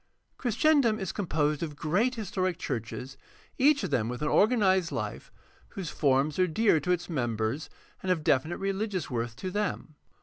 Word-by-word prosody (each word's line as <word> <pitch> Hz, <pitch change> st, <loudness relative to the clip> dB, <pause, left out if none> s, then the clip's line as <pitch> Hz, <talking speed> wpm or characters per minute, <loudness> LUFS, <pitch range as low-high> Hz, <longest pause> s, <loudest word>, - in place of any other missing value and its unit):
Christendom 240 Hz, -1 st, +3 dB
is 190 Hz, -4 st, -3 dB
composed 155 Hz, -6 st, 0 dB
of 155 Hz, -3 st, -4 dB
great 200 Hz, -, +1 dB
historic 185 Hz, -5 st, -2 dB
churches, 125 Hz, +2 st, -5 dB, 0.4 s
each 285 Hz, -1 st, +4 dB
of 185 Hz, -, -3 dB
them 115 Hz, -4 st, +1 dB
with 125 Hz, +3 st, -4 dB
an -, -, +1 dB
organized 195 Hz, -6 st, +3 dB
Hfe, -, -, -5 dB, 0.4 s
whose 190 Hz, -7 st, -6 dB
forms 140 Hz, +2 st, +1 dB
are 185 Hz, -, +4 dB
dear 180 Hz, 0 st, +3 dB
to 180 Hz, -, -1 dB
its 175 Hz, -1 st, 0 dB
mem 120 Hz, -9 st, -1 dB
bers 110 Hz, +8 st, -2 dB, 0.3 s
and 185 Hz, -, 0 dB
of 165 Hz, -4 st, 0 dB
definite 150 Hz, +5 st, +2 dB
religious 195 Hz, -4 st, -2 dB
worth 115 Hz, -1 st, -2 dB
to 185 Hz, +7 st, -5 dB
them. 205 Hz, -5 st, -2 dB
175 Hz, 170 wpm, -28 LUFS, 145-205 Hz, 0.4 s, each